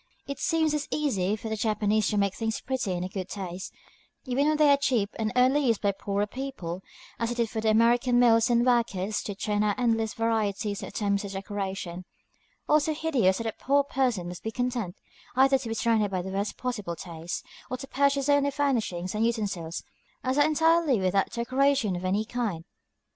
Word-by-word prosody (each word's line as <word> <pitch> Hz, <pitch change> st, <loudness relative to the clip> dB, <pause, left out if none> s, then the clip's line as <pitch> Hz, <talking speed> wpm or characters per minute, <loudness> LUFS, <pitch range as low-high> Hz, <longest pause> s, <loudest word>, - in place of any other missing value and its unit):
It 280 Hz, -, -6 dB
seems 320 Hz, -2 st, +1 dB
as 295 Hz, -1 st, -2 dB
easy 210 Hz, -10 st, 0 dB
for 220 Hz, -, -7 dB
the 220 Hz, -, -2 dB
Japanese 215 Hz, -1 st, +1 dB
to 210 Hz, -, 0 dB
make 200 Hz, -1 st, +2 dB
things 225 Hz, +1 st, -2 dB
pretty 250 Hz, -7 st, -2 dB
and 175 Hz, 0 st, -2 dB
in -, -, -5 dB
good 190 Hz, -2 st, -5 dB
taste, 185 Hz, -2 st, -6 dB, 0.5 s
even 270 Hz, +3 st, +1 dB
when 305 Hz, 0 st, +2 dB
they 300 Hz, -1 st, +5 dB
are -, -, +7 dB
cheap 235 Hz, -7 st, +1 dB
and 215 Hz, -1 st, 0 dB
only 260 Hz, +3 st, +4 dB
used 230 Hz, -3 st, +2 dB
by 200 Hz, -, +2 dB
the 195 Hz, -, -17 dB
poorer 200 Hz, 0 st, 0 dB
people, 210 Hz, -8 st, -5 dB, 0.4 s
as 230 Hz, -, 0 dB
it 240 Hz, -, -4 dB
is 235 Hz, -2 st, 0 dB
for 220 Hz, -, -2 dB
American 235 Hz, +3 st, +3 dB
mills 235 Hz, -1 st, +5 dB
and 240 Hz, 0 st, +3 dB
workers 220 Hz, -5 st, +1 dB
to 205 Hz, -, -5 dB
turn 210 Hz, +1 st, -1 dB
out 210 Hz, -1 st, +1 dB
endless 225 Hz, -3 st, +1 dB
varieties 215 Hz, -2 st, -1 dB
of -, -, -6 dB
attempts 200 Hz, -1 st, 0 dB
at 200 Hz, -1 st, -6 dB
decoration, 190 Hz, -2 st, -4 dB, 0.6 s
all 300 Hz, -, +5 dB
so 305 Hz, +1 st, -1 dB
hideous 265 Hz, -13 st, +2 dB
that 230 Hz, -, -4 dB
a 225 Hz, -, 0 dB
poor 280 Hz, +4 st, +2 dB
person 250 Hz, -10 st, 0 dB
must 175 Hz, -2 st, -7 dB
be 220 Hz, -, -3 dB
content, 240 Hz, -6 st, -2 dB, 0.4 s
either 270 Hz, +1 st, +5 dB
to 245 Hz, -3 st, -6 dB
be 225 Hz, -, -2 dB
surrounded 220 Hz, -3 st, +2 dB
by 185 Hz, -2 st, -2 dB
the 190 Hz, -, -5 dB
worst 200 Hz, +2 st, -2 dB
possible 210 Hz, -9 st, -3 dB
taste, 165 Hz, 0 st, -6 dB, 0.2 s
or 255 Hz, -, -3 dB
to 270 Hz, -, -7 dB
purchase 280 Hz, 0 st, +1 dB
only 285 Hz, -1 st, +4 dB
such 280 Hz, -, -9 dB
furnishings 220 Hz, -11 st, 0 dB
and 215 Hz, +1 st, 0 dB
utensils 200 Hz, -8 st, -2 dB, 0.4 s
as 255 Hz, 0 st, 0 dB
are 290 Hz, -, +6 dB
entirely 320 Hz, -4 st, +3 dB
without 190 Hz, +1 st, +1 dB
decoration 255 Hz, -3 st, +1 dB
of 175 Hz, -, -5 dB
any 195 Hz, +4 st, 0 dB
kind. 220 Hz, -9 st, -3 dB
225 Hz, 205 wpm, -27 LUFS, 200-260 Hz, 0.6 s, are